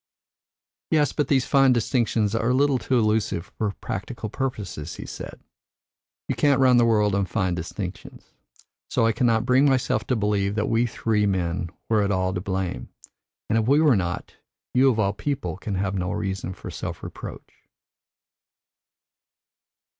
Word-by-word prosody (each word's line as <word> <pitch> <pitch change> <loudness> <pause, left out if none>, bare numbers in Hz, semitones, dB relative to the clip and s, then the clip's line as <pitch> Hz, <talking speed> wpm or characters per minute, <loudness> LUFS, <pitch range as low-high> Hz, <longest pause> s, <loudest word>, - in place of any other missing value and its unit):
"Yes, 150 -4 +2
but 150 - 0
these 135 -4 +2
fine 135 -2 +4
distinctions 115 -3 +1
are 115 +1 0
a 125 - +3
little 140 -1 +3
too 125 +2 0
elusive 105 -5 0
for 110 - +1
practical 110 +3 -5
purposes," 105 - -4
he - - -8
said. - - -8 0.9
"You - - 0
can't 140 -2 +3
run 130 -2 +5
the 120 -1 +5
world 105 -3 +3
on 100 -1 +1
fine 95 -4 0
distinctions; 90 +2 -7 0.6
so 115 - +2
I 115 - +4
cannot 115 0 +1
bring 130 +3 +4
myself 125 -5 0
to 125 - +1
believe 105 -2 0
that 105 -1 0
we 115 +2 +2
three 105 -2 0
men 85 -2 -1 0.2
were 110 -2 +3
at 100 - +1
all 95 -1 0
to 90 - -3
blame, 95 -1 -3 0.6
and 110 - +2
if 110 - -1
we 140 +3 +5
were 150 -6 +5
not, 90 -3 -3 0.4
you 130 +2 +5
of 120 - +1
all 100 -2 +1
people 140 +2 -3
can 100 +1 -4
have 95 +1 -1
no 90 -2 -2
reason 95 -1 -3
for - - -8
self - - -6
reproach." - - -9
110 Hz, 165 wpm, -24 LUFS, 95-125 Hz, 0.9 s, run